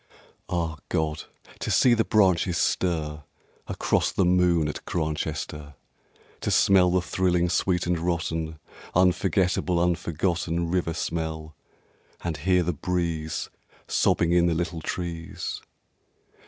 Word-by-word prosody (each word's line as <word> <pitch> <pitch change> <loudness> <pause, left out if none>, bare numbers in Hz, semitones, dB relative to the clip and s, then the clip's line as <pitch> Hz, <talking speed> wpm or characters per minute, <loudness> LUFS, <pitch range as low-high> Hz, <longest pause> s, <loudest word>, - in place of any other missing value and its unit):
Ah 85 -3 -2
God! 80 -1 -1 0.3
to - - -3
see 125 - +5
the 115 -1 +3
branches 95 -5 +3
stir 75 -5 -1 0.4
Across - - 0
the 95 - +2
moon 90 -3 +3
at 75 - -5
Grantchester! 75 -2 -3 0.6
To - - -2
smell 95 -2 +5
the 90 0 +1
thrilling 90 -1 +1
sweet 90 0 +1
and 90 -1 0
rotten 80 -2 -2 0.4
Unforgettable, 90 -1 +2
unforgotten 85 0 0
River 85 -3 0
smell, 80 -2 -4 0.7
and 85 -2 -2
hear 90 +4 +2
the 90 +1 -1
breeze 85 -1 -2 0.4
Sobbing 85 - +2
in 85 0 +4
the 85 - +1
little 85 0 -2
trees. 85 0 -5
85 Hz, 115 wpm, -26 LUFS, 80-90 Hz, 0.7 s, see